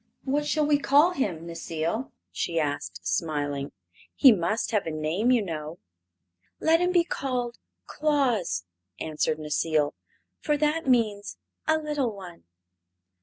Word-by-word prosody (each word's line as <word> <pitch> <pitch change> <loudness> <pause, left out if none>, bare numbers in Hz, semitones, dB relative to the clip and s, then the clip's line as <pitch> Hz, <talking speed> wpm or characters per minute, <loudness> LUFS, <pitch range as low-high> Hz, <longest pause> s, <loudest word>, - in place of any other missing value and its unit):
"What 290 +2 0
shall 305 0 +2
we 290 -1 +3
call 290 +5 +5
him, 180 - -2
Necile?" 165 +7 -3 0.2
she 165 -1 -1
asked, 145 - -3
smiling. 145 - -1 0.4
"He 265 - +8
must 215 +4 0
have 210 -6 0
a - - -1
name, 155 +9 0
you 245 -4 +4
know." 155 -1 -5 0.8
"Let 325 +1 +4
him 355 +1 +2
be 350 -2 +4
called 250 -6 -3 0.3
Claus," 245 - 0 0.3
answered 155 0 -1
Necile, 150 0 0 0.5
"for 300 -1 0
that 300 +1 0
means 215 -5 +1 0.3
'a 315 0 +4
little 295 -7 -2
one.'" 180 - -11
215 Hz, 130 wpm, -27 LUFS, -, 0.8 s, He